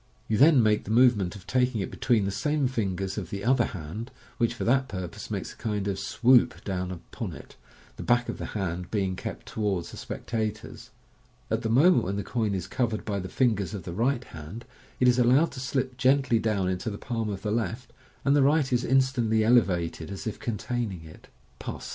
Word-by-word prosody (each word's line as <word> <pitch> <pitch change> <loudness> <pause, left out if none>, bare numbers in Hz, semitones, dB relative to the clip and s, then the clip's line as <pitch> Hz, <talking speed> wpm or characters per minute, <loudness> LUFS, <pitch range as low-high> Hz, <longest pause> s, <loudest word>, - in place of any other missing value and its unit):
You 110 - +1
then 140 +1 +6
make 105 -1 +2
the - - -8
movement 110 -6 +4
of 100 -2 -11
taking 125 -1 +1
it 95 - -3
between 110 -3 +1
the 100 - -1
same 145 +7 0
fingers 95 -5 -2
of 90 -5 -7
the 100 +1 -5
other 130 +2 +4
hand, 95 +7 -6 0.3
which 120 0 +1
for - - -4
that 130 +2 +2
purpose 95 -6 -6
makes - - -4
a - - -21
kind 105 -3 -2
of 100 -1 -2
"swoop" 125 +1 +3
down 90 -2 -3
upon 90 -2 -6
it, - - -12 0.4
the - - -6
back 120 0 +2
of - - -5
the - - -4
hand 90 -2 -3
being 95 -3 -1
kept - - -6
towards 100 -6 -2
the - - -10
specta 110 -2 -3
tors. 110 - -12 0.6
At - - +1
the 110 - -2
moment 150 - +5
when 95 +2 -2
the 100 - -2
coin 110 -5 -1
is 90 -2 -3
covered 115 +1 -2
by 100 -2 -1
the 90 -1 -6
fingers 105 -6 +1
of 95 - -6
the 85 - -6
right 120 +5 +1
hand, 80 +8 -9 0.3
it 125 - +4
is 125 0 +4
allowed 130 +7 +4
to 130 - -8
slip 130 0 -2
gently 130 -2 +3
dowr: 105 -4 0
into 95 +4 -2
the 100 - -5
palm 115 -2 -3
of 100 -2 -5
the 105 - -1
left, 115 +2 -3 0.3
and 140 +1 +4
the 145 - +5
right 140 -1 +3
is 125 0 +2
instantly 125 -4 +2
elevated 90 -9 +2
as 100 -1 -6
if 110 - -4
containing 115 -5 -3
it. 80 -1 -14 0.3
Pass - - -6
6. - - -6
110 Hz, 215 wpm, -27 LUFS, 95-125 Hz, 0.6 s, then